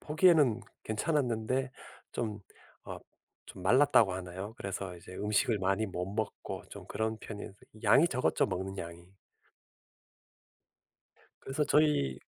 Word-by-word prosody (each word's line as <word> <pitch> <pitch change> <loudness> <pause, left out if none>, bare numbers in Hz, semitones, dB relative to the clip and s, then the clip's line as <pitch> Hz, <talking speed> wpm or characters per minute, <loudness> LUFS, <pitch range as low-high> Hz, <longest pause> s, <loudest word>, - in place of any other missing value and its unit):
보기에는 150 - +4 0.2
괜찮았는데 130 0 0 0.4
좀 110 -3 -3 0.4
어 - - -6 0.5
좀 90 - -11
말랐다고 120 -2 +5
하나요? 95 +3 -6
그래서 95 -1 -4
이제 90 +2 -12
음식을 105 +2 +1
많이 95 +3 +1
못 90 -2 -3
먹고 105 +1 -4
좀 - - -9
그런 110 0 -2
편이었는데 105 -2 -8 0.2
양이 165 - +6
적었죠 130 - +1
먹는 95 +2 -4
양이. 85 +1 -7 2.4
그래서 135 +3 -1
저희 145 - +3
110 Hz, 265 characters per minute, -31 LUFS, 95-130 Hz, 2.4 s, 양이